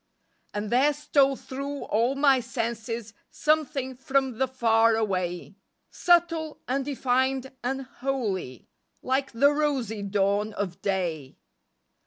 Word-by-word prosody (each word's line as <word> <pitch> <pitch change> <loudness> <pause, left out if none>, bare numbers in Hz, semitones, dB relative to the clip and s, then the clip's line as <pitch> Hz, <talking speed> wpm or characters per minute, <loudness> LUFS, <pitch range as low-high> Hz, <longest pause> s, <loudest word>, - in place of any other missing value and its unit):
And 205 0 -4
there 270 +5 +4
stole 280 -2 +2
thru 275 +2 -6
all 235 +5 +1
my 275 -2 +4
senses 230 -2 -4 0.2
Something 295 -4 0
from 265 -2 0
the 265 - +2
far 230 -3 +3
away, 185 -3 -2 0.3
Subtile, 335 -3 +2
undefined 265 0 0
and 265 +2 -2
holy, 235 - -4 0.4
Like 265 +1 0
the 280 +5 +4
rosy 270 -8 -1
dawn 200 +1 0
of 195 -4 -4
day. 170 -8 -2
255 Hz, 110 wpm, -26 LUFS, 215-275 Hz, 0.4 s, there